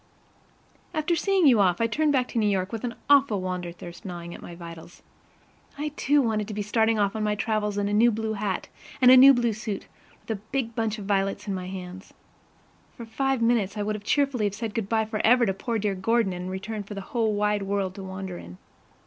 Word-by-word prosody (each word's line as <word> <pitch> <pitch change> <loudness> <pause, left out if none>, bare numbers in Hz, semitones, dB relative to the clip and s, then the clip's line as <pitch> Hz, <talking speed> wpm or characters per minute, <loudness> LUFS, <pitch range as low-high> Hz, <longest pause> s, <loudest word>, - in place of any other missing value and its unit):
After 310 +2 +1
seeing 375 +2 +2
you 250 -6 +6
off, 180 -3 +3
I 230 - +2
turned 295 +7 +1
back 255 -3 +1
to 235 - -1
New 210 -1 +2
York 190 -1 -1
with 225 -2 -5
an 245 -1 -3
awful 275 -7 +4
wander 180 -1 -4
thirst 175 0 -11
gnawing 175 -2 -7
at - - -10
my 175 - -9
vitals. 170 0 -11 0.7
I, 300 +1 -2
too, 290 -1 +2
wanted 215 -3 -1
to 215 - -6
be 210 - -2
starting 220 +1 +2
off 205 0 +1
on 220 - -2
my 210 0 +1
travels 210 -1 -1
in 200 0 0
a 205 - -2
new 230 +3 +5
blue 220 -1 -2
hat 200 -2 -3 0.3
and 250 -1 +7
a - - +10
new 265 +2 +10
blue 240 -3 +1
suit 215 -1 -5 0.3
with - - -8
a 205 -3 -3
big 260 -4 -1
bunch 225 -1 -1
of 205 - -7
violets 195 +1 -1
in 200 - -1
my 185 -1 -4
hand. 185 0 -8 0.9
For 235 - -7
five 270 +2 -1
minutes 225 -3 +1
I 205 - -1
would 210 0 -3
cheerfully 275 -1 +1
have 200 -1 -1
said 225 0 -4
good 215 -3 -3
by 220 -1 +2
forever 230 +3 +3
to 195 - 0
poor 230 +4 -3
dear 210 -1 0
Gordon 195 +1 +1
in 180 +1 -5
return 200 +3 -4
for 205 +1 -8
the 195 -1 -6
wide 210 -3 +1
world 195 -1 -1
to 195 - -9
wander 190 -1 -6
in. 90 +1 -11
210 Hz, 225 wpm, -26 LUFS, 195-235 Hz, 0.9 s, a